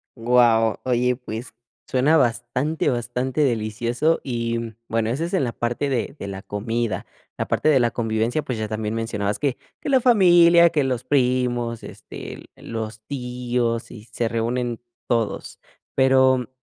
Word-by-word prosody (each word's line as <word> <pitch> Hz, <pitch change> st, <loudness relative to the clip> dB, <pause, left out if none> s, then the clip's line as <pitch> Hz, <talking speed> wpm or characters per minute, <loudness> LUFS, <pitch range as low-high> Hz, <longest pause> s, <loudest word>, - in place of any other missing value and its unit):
Guau, 115 Hz, -2 st, +3 dB
oye 125 Hz, 0 st, +1 dB
pues 120 Hz, -1 st, -7 dB, 0.3 s
suena 145 Hz, +5 st, +3 dB
bastante 125 Hz, +4 st, 0 dB
bastante, 125 Hz, +3 st, -1 dB
delicioso 120 Hz, +5 st, +1 dB
y 115 Hz, -2 st, -3 dB
bueno, 115 Hz, -1 st, 0 dB
eso 135 Hz, +8 st, -1 dB
es 170 Hz, -, -4 dB
en 185 Hz, -, +2 dB
la 120 Hz, -, -1 dB
parte 120 Hz, +4 st, -2 dB
de 130 Hz, 0 st, -2 dB
de 100 Hz, -, -5 dB
la 95 Hz, -1 st, -6 dB
comida. 110 Hz, -1 st, -2 dB, 0.3 s
La -, -, -2 dB
parte -, -, +1 dB
de 140 Hz, -4 st, +5 dB
la 120 Hz, -1 st, +2 dB
convivencia, 115 Hz, +5 st, -1 dB
pues 125 Hz, -, -4 dB
ya 110 Hz, -1 st, -2 dB
también 110 Hz, 0 st, -3 dB
mencionabas 105 Hz, -3 st, -2 dB
que 140 Hz, -4 st, 0 dB, 0.2 s
que -, -, -5 dB
la 265 Hz, -2 st, +4 dB
familia, 175 Hz, -7 st, +6 dB
que 150 Hz, -, +1 dB
los 130 Hz, -2 st, -1 dB
primos, 125 Hz, -3 st, 0 dB
este, -, -, -9 dB
los 110 Hz, -1 st, -6 dB
tíos 125 Hz, -3 st, -2 dB
y 105 Hz, -, -10 dB
se 120 Hz, -, -1 dB
reúnen 120 Hz, +1 st, -2 dB, 0.3 s
todos. 115 Hz, -3 st, -2 dB, 0.4 s
Pero 130 Hz, -2 st, +4 dB
120 Hz, 150 wpm, -23 LUFS, 115-130 Hz, 0.4 s, familia